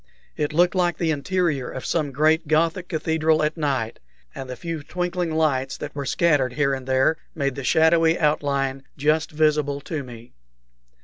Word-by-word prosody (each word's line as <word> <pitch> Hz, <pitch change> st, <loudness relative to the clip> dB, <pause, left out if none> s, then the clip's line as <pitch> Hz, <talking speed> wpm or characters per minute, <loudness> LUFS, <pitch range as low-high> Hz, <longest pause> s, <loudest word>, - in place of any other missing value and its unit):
It 150 Hz, -1 st, -1 dB
looked 175 Hz, +3 st, +3 dB
like 175 Hz, -2 st, +1 dB
the 165 Hz, -2 st, 0 dB
interior 150 Hz, -2 st, -1 dB
of 130 Hz, -, -7 dB
some 155 Hz, -4 st, -1 dB
great 155 Hz, +4 st, +2 dB
Gothic 165 Hz, +3 st, +1 dB
cathedral 160 Hz, -1 st, +1 dB
at 150 Hz, +1 st, 0 dB
night, 135 Hz, -8 st, -2 dB, 0.3 s
and 135 Hz, -1 st, -7 dB
the 125 Hz, -, -5 dB
few 165 Hz, +4 st, -5 dB
twinkling 180 Hz, +2 st, -2 dB
lights 135 Hz, -4 st, 0 dB
that -, -, -7 dB
were 140 Hz, -2 st, -5 dB
scattered 145 Hz, -7 st, +2 dB
here 140 Hz, 0 st, +1 dB
and 130 Hz, -1 st, -5 dB
there 130 Hz, +4 st, +2 dB, 0.2 s
made 140 Hz, -4 st, -1 dB
the 140 Hz, +1 st, -6 dB
shadowy 160 Hz, +4 st, +4 dB
outline 140 Hz, -3 st, 0 dB, 0.2 s
just 155 Hz, +2 st, +1 dB
visible 150 Hz, -2 st, +1 dB
to 155 Hz, +1 st, -4 dB
me. 120 Hz, -2 st, -12 dB
150 Hz, 170 wpm, -23 LUFS, 135-160 Hz, 0.3 s, shadowy